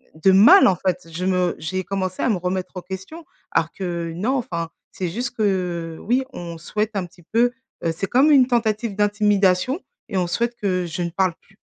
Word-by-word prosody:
de 175 Hz, +5 st, +4 dB
mal 225 Hz, -, +8 dB
en 190 Hz, -, +3 dB
fait?» 180 Hz, -1 st, -2 dB
Je 175 Hz, +3 st, -4 dB
me 180 Hz, -2 st, +1 dB
j'ai 185 Hz, +4 st, -3 dB
commencé 185 Hz, -1 st, -3 dB
à -, -, +2 dB
me 215 Hz, -, +2 dB
remettre 180 Hz, +1 st, -3 dB
en 185 Hz, -, -4 dB
question. 190 Hz, -, -8 dB, 0.3 s
Alors 165 Hz, -, +1 dB
que 170 Hz, -3 st, -4 dB
non, 225 Hz, +10 st, 0 dB
enfin 170 Hz, -9 st, -3 dB, 0.2 s
c'est 180 Hz, -2 st, -3 dB
juste 235 Hz, +8 st, -3 dB
que 180 Hz, -6 st, -1 dB
oui, 250 Hz, +4 st, +1 dB
on 170 Hz, -4 st, -7 dB
souhaite 210 Hz, +6 st, -2 dB
un 195 Hz, -2 st, -1 dB
petit 175 Hz, 0 st, -18 dB
peu, 235 Hz, +7 st, +2 dB, 0.3 s
heu 165 Hz, -, +1 dB
c'est 195 Hz, -, -2 dB
comme 270 Hz, +8 st, +4 dB
une 265 Hz, -4 st, +6 dB
tentative 225 Hz, -3 st, 0 dB
d'intimidation 205 Hz, -, +2 dB, 0.3 s
et 195 Hz, -, -2 dB
on 180 Hz, -1 st, +1 dB
souhaite 235 Hz, +7 st, -1 dB
que 185 Hz, -3 st, -1 dB
je 170 Hz, +2 st, -4 dB
ne 170 Hz, -, -2 dB
parle 185 Hz, 0 st, +1 dB
plus. 195 Hz, -, -26 dB
190 Hz, 205 wpm, -22 LUFS, 175-220 Hz, 0.3 s, mal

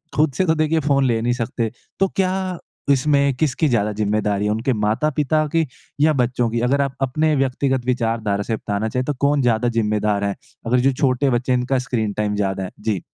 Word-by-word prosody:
खुद 150 Hz, -1 st, +3 dB
से 185 Hz, -, +2 dB
तो 160 Hz, -1 st, +2 dB
देखिए 155 Hz, +1 st, +1 dB
फ़ोन 140 Hz, -2 st, +2 dB
ले 115 Hz, -3 st, +1 dB
नहीं 120 Hz, +1 st, +1 dB
सकते। 115 Hz, -2 st, -2 dB, 0.3 s
तो 195 Hz, -, +4 dB
क्या 185 Hz, -1 st, +1 dB, 0.6 s
इसमें 140 Hz, 0 st, +3 dB
किसकी 155 Hz, +1 st, +1 dB
ज़्यादा 105 Hz, -4 st, +1 dB
जिम्मेदारी 105 Hz, -1 st, 0 dB
है 105 Hz, -, +1 dB
उनके 120 Hz, +4 st, 0 dB
माता-पिता 145 Hz, +8 st, +1 dB
की 165 Hz, -1 st, +3 dB, 0.4 s
या 155 Hz, 0 st, +5 dB
बच्चों 125 Hz, -2 st, +1 dB
की? 115 Hz, +1 st, -1 dB
अगर 135 Hz, +4 st, +2 dB
आप 140 Hz, -1 st, -2 dB
अपने 155 Hz, +4 st, +1 dB
व्यक्तिगत 135 Hz, -1 st, 0 dB
विचारधारा 115 Hz, -5 st, 0 dB
से 115 Hz, -, -2 dB
बताना 105 Hz, +1 st, -2 dB
चाहे 125 Hz, +1 st, -1 dB
तो 145 Hz, -, -1 dB
कौन 140 Hz, 0 st, +2 dB
ज़्यादा 120 Hz, 0 st, +2 dB
ज़िम्मेदार 105 Hz, -1 st, 0 dB
है? 100 Hz, -1 st, -1 dB, 0.3 s
अगर 125 Hz, +2 st, +2 dB
जो 135 Hz, +2 st, +3 dB
छोटे 130 Hz, +1 st, +1 dB
बच्चे 125 Hz, +1 st, 0 dB
हैं 125 Hz, -, +3 dB
इनका 130 Hz, +2 st, 0 dB
स्क्रीन 110 Hz, -5 st, -1 dB
टाइम 105 Hz, -1 st, 0 dB
ज़्यादा 95 Hz, -2 st, -1 dB
है? 95 Hz, -, -6 dB
जी। 105 Hz, -6 st, -1 dB
125 Hz, 205 wpm, -21 LUFS, 110-140 Hz, 0.6 s, या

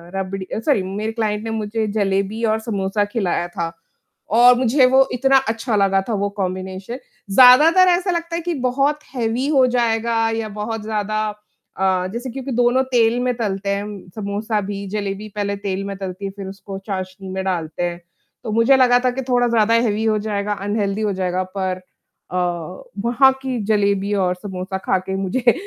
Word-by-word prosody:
रबड़ी 190 Hz, 0 st, -4 dB
sorry 225 Hz, -2 st, +1 dB
मेरे 205 Hz, +4 st, -3 dB
client 215 Hz, -2 st, -2 dB
ने 225 Hz, -, -4 dB
मुझे 220 Hz, 0 st, -2 dB
जलेबी 200 Hz, +2 st, 0 dB
और 220 Hz, 0 st, +1 dB
समोसा 205 Hz, -2 st, -1 dB
खिलाया 195 Hz, -5 st, -1 dB
था। 170 Hz, -2 st, -4 dB, 0.6 s
और 245 Hz, +1 st, +7 dB
मुझे 255 Hz, +2 st, +4 dB
वो 265 Hz, +1 st, +5 dB
इतना 270 Hz, +2 st, +4 dB
अच्छा 225 Hz, 0 st, -1 dB
लगा 195 Hz, -1 st, +3 dB
था -, -, 0 dB
वो 200 Hz, -, 0 dB
कॉम्बिनेशन। 190 Hz, +4 st, -4 dB, 0.3 s
ज़्यादातर 295 Hz, -, +7 dB
ऐसा 360 Hz, +1 st, +2 dB
लगता 335 Hz, -1 st, -3 dB
है 340 Hz, -, -2 dB
कि 345 Hz, +1 st, -2 dB
बहुत 275 Hz, +4 st, +1 dB
हेवी 240 Hz, +2 st, -1 dB
हो 275 Hz, -4 st, +4 dB
जाएगा 225 Hz, -1 st, +1 dB
या 220 Hz, -1 st, -3 dB
बहुत 215 Hz, +2 st, -4 dB
ज़्यादा 215 Hz, 0 st, -2 dB, 0.6 s
अ, 185 Hz, -1 st, +1 dB
जैसे 245 Hz, +2 st, -4 dB
क्योंकि 270 Hz, +2 st, -6 dB
दोनों 245 Hz, +2 st, +3 dB
तेल 235 Hz, 0 st, +3 dB
में 250 Hz, 0 st, +1 dB
तलते 200 Hz, -3 st, -2 dB
हैं 200 Hz, 0 st, 0 dB
हम 205 Hz, -3 st, -9 dB
समोसा 210 Hz, +1 st, -2 dB
भी 200 Hz, 0 st, -5 dB
जलेबी 205 Hz, 0 st, -4 dB
पहले 200 Hz, -1 st, -1 dB
तेल 195 Hz, -1 st, -3 dB
में 200 Hz, -, -4 dB
तलती 190 Hz, 0 st, -6 dB
है 195 Hz, -, -3 dB
फिर 195 Hz, -1 st, -6 dB
उसको 195 Hz, 0 st, -8 dB
चाशनी 190 Hz, -1 st, -5 dB
में 190 Hz, 0 st, -3 dB
डालते 170 Hz, -2 st, -2 dB
हैं। 175 Hz, 0 st, -2 dB, 0.4 s
तो 220 Hz, -, -4 dB
मुझे 230 Hz, +5 st, +4 dB
लगा 245 Hz, -1 st, +5 dB
था 250 Hz, -, +3 dB
कि 265 Hz, -, -4 dB
थोड़ा 245 Hz, -1 st, +3 dB
ज़्यादा 230 Hz, -1 st, +3 dB
हेवी 220 Hz, -2 st, +1 dB
हो 215 Hz, -1 st, +2 dB
जाएगा, 205 Hz, -1 st, -2 dB
अनहेल्दी 205 Hz, 0 st, -2 dB
हो 210 Hz, -2 st, 0 dB
जाएगा 185 Hz, 0 st, -1 dB
पर 185 Hz, -1 st, -1 dB, 0.5 s
अ, -, -, -4 dB, 0.7 s
वहाँ 265 Hz, +3 st, +5 dB
की 260 Hz, -2 st, -2 dB
जलेबी 200 Hz, -1 st, +1 dB
और 180 Hz, -, 0 dB
समोसा 190 Hz, 0 st, -5 dB
खा 190 Hz, -, +2 dB
के 190 Hz, -, -2 dB
मुझे 215 Hz, +6 st, +2 dB
210 Hz, 180 wpm, -20 LUFS, 195-240 Hz, 0.7 s, और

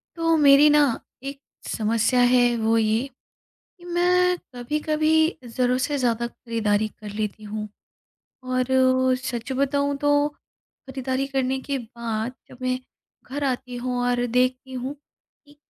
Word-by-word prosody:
तो 330 Hz, -1 st, +2 dB
मेरी 290 Hz, 0 st, +7 dB
ना 295 Hz, 0 st, +5 dB, 0.4 s
एक 275 Hz, 0 st, -6 dB, 0.3 s
समस्या 230 Hz, +3 st, +1 dB
है, 245 Hz, -1 st, +4 dB
वो 225 Hz, 0 st, +2 dB
ये 225 Hz, +3 st, +1 dB, 0.7 s
कि 350 Hz, -, -16 dB
मैं 360 Hz, +1 st, +2 dB, 0.2 s
कभी-कभी 310 Hz, +5 st, +1 dB
ज़रूरत 250 Hz, +1 st, 0 dB
से 285 Hz, +2 st, -1 dB
ज़्यादा 235 Hz, -2 st, 0 dB
खरीदारी 220 Hz, -3 st, -1 dB
कर 210 Hz, -1 st, -8 dB
लेती 215 Hz, 0 st, -3 dB
हूँ। 210 Hz, 0 st, -5 dB, 0.8 s
और 255 Hz, 0 st, 0 dB, 0.5 s
सच 250 Hz, -1 st, -5 dB
बताऊँ 280 Hz, +1 st, 0 dB
तो, 290 Hz, 0 st, +3 dB, 0.6 s
खरीदारी 265 Hz, 0 st, -2 dB
करने 265 Hz, -1 st, 0 dB
के 275 Hz, +1 st, -3 dB
बाद 235 Hz, -1 st, -4 dB, 0.2 s
जब -, -, -13 dB
मैं 255 Hz, 0 st, 0 dB, 0.5 s
घर 285 Hz, +2 st, -3 dB
आती 255 Hz, -2 st, -2 dB
हूँ 250 Hz, +1 st, -3 dB
और 245 Hz, 0 st, +1 dB
देखती 255 Hz, +2 st, 0 dB
हूँ 255 Hz, +2 st, -4 dB
कि 290 Hz, 0 st, -27 dB
255 Hz, 135 wpm, -24 LUFS, 235-285 Hz, 0.8 s, मेरी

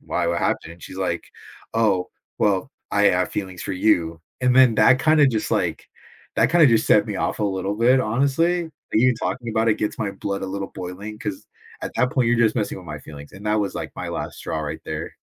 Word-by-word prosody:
why, -, -, -2 dB
what 85 Hz, 0 st, 0 dB
happened?" 85 Hz, -, -1 dB
and 85 Hz, -, -20 dB
she's -, -, -9 dB
like, 90 Hz, -3 st, -2 dB, 0.5 s
"Oh, 100 Hz, -5 st, +1 dB, 0.3 s
well, 100 Hz, +4 st, +1 dB, 0.2 s
I 100 Hz, 0 st, +2 dB
have 90 Hz, -2 st, +3 dB
feelings 95 Hz, -3 st, -5 dB
for 95 Hz, -, -3 dB
you." 85 Hz, -4 st, +1 dB, 0.2 s
And 125 Hz, 0 st, +3 dB
then 130 Hz, -4 st, +7 dB
that 115 Hz, +4 st, +6 dB
kinda 155 Hz, -2 st, +5 dB
just, 115 Hz, -5 st, -1 dB
like, -, -, -1 dB, 0.5 s
that -, -, +4 dB
kinda 165 Hz, -3 st, +6 dB
just 115 Hz, -3 st, +3 dB
set -, -, +5 dB
me -, -, -4 dB
off -, -, -1 dB
a 105 Hz, -, +1 dB
little 95 Hz, 0 st, -1 dB
bit, 125 Hz, +4 st, +4 dB
honestly. 140 Hz, +9 st, +1 dB, 0.2 s
Even 125 Hz, +3 st, +4 dB
talking 120 Hz, 0 st, -3 dB
about 110 Hz, +1 st, +1 dB
it 110 Hz, -, +3 dB
gets 105 Hz, -, -2 dB
my 105 Hz, -3 st, -1 dB
blood 100 Hz, 0 st, -4 dB
a -, -, -2 dB
little 95 Hz, +1 st, -4 dB
boiling, 95 Hz, +4 st, -7 dB
'cause 105 Hz, -4 st, -5 dB, 0.4 s
at -, -, -4 dB
that 125 Hz, 0 st, +2 dB
point, 130 Hz, -3 st, +2 dB
you're 120 Hz, 0 st, +2 dB
just 110 Hz, -2 st, +3 dB
messing 105 Hz, -4 st, -1 dB
with 90 Hz, -, -13 dB
my 75 Hz, -1 st, -6 dB
feelings, 70 Hz, -1 st, -11 dB
and 100 Hz, +2 st, -12 dB
that 105 Hz, 0 st, +2 dB
was, 100 Hz, -, -2 dB
like, -, -, -5 dB
my -, -, -4 dB
last -, -, -5 dB
straw 80 Hz, -, -3 dB
right 75 Hz, -1 st, -5 dB
there. -, -, -5 dB
105 Hz, 225 wpm, -23 LUFS, 95-120 Hz, 0.5 s, then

